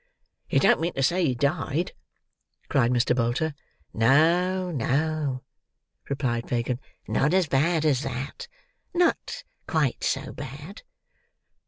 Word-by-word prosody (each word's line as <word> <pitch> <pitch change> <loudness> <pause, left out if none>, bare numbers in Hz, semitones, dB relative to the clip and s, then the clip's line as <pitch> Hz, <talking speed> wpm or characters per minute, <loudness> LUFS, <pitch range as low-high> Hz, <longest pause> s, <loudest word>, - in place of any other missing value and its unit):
"You - - +3
don't - - +4
mean 170 +1 -1
to 135 - -1
say 175 +6 +2
he 130 -6 +1
died?" 145 +4 0 0.8
cried 120 - +3
Mr. 125 0 +2
Bolter. 125 +6 0 0.4
"No, 175 +10 +3
no," 145 0 -1 0.7
replied 125 -4 -1
Fagin, 120 0 -1 0.3
"not 150 +5 +1
so 190 0 +4
bad 155 +4 +2
as 140 -4 +3
that. 135 - -5 0.5
Not 350 -1 +1 0.2
quite 150 -6 0
so - - -1
bad." 150 - -8
145 Hz, 120 wpm, -26 LUFS, 125-165 Hz, 0.8 s, don't